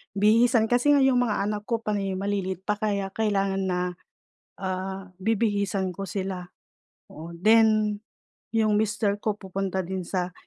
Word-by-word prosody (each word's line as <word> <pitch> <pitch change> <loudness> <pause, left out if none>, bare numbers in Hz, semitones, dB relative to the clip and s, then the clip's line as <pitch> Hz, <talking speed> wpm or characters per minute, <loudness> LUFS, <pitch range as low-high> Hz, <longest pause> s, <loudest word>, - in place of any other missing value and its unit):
bihisan 225 +3 +4
kasi 245 +4 +4
nga 280 - +4
'yong 260 -2 +4
mga 215 -5 +1
anak 210 0 -3
ko 230 -1 -1
panay 200 -2 -1
maliliit 190 -2 -2
pa 210 +1 -1
kaya 200 -2 -1
kailangan 195 -3 0
na, 180 -1 0 0.8
ah, 190 0 -4 0.2
bibihisan 200 -4 0
ko 195 - -6
sila, 190 -2 -4 0.6
oo. 160 +2 -10
Then 215 0 +4 0.6
'yong 215 -2 +3
mister 210 -1 0
ko 210 -1 -1
pupunta 190 -1 -3
din 190 +2 -4
sa, 180 0 -3
200 Hz, 145 wpm, -26 LUFS, 190-215 Hz, 0.8 s, bihisan